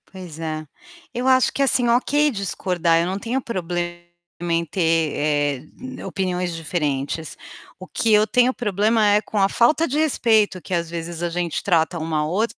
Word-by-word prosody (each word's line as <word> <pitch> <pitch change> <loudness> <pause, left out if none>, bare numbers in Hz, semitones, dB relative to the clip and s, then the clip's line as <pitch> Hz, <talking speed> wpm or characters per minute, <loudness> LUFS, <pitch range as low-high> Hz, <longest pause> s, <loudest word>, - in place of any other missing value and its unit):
Pois 180 -5 -10
é, 155 -1 -4 0.5
eu 245 +2 -2
acho 260 -1 +4
que - - -2
assim, 250 -2 +2
ok, 290 +5 +2
discordar. 180 -5 0
Eu 170 - +1
não 190 +1 -2
tenho 245 +5 -2
problema 175 -6 -3 0.4
em 170 -1 0
ter, 155 -4 0 0.3
eh, - - -8
opiniões 180 -2 -2
diferentes. 155 -2 -3 0.4
O 185 - -10
que 225 - 0
eu 210 0 +5
tenho 250 +3 +3
problema 215 0 +1
é 205 +1 +4
com 215 - -6
a 195 - +4
falta 305 +10 +3
de 280 - -2
respeito, 220 - +2
que 185 - -7
às 170 -1 -1
vezes 170 0 -6
a 175 - 0
gente 170 -1 -2
trata 170 -2 +1
um 160 0 -4
ao 150 0 0
ou 200 +7 +1
180 Hz, 175 wpm, -22 LUFS, 165-220 Hz, 0.5 s, eu